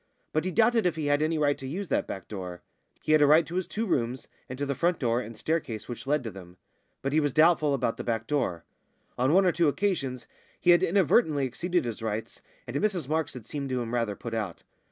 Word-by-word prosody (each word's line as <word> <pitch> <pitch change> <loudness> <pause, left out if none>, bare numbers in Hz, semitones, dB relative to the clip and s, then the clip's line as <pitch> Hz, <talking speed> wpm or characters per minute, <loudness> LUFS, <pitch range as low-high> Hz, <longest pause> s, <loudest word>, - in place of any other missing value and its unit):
But 155 +2 0
he 185 - -1
doubted 225 +1 +3
if 170 - -1
he 155 -2 -3
had 145 0 +2
any 160 +1 +1
right 145 -1 +2
to 135 - -6
use 180 +6 -4
that - - 0
back 95 - -6
door. 90 -4 -7 0.4
He - - 0
had 155 -1 +6
a 145 - +6
right 155 +3 +6
to 170 - -9
his 185 0 -1
two 225 +2 -2
rooms 125 - -1 0.2
and 130 - -6
to 145 - -2
the 140 - -1
front 170 +5 +1
door 120 -2 +1
and 115 -1 -9
staircase 120 -8 -2
which 120 +2 -7
led 145 -1 +1
to 115 - -5
them; 90 -2 -12 0.5
but 135 +1 -1
he 155 - +4
was 145 -2 +1
doubtful 155 -1 +4
about 120 -3 -1
the - - -5
back 115 -2 -2
door. 115 - -1 0.6
On 130 +3 +3
one 190 +3 +5
or 180 - +4
two 170 -1 +2
occasions 145 -7 -1 0.3
he 175 - +5
had 175 - +6
inadvertently 165 - +3
exceeded 175 +6 -1
his 115 -1 -5
rights, 110 0 -4 0.2
and 120 - -7
Mrs 185 -6 0
Marks 155 0 -1
had 120 -4 -9
seemed 140 +2 -5
to 130 -1 -1
him 120 -1 -4
rather 115 -4 0
put 115 +2 -7
out. 105 -6 -4
145 Hz, 245 wpm, -28 LUFS, 115-165 Hz, 0.6 s, had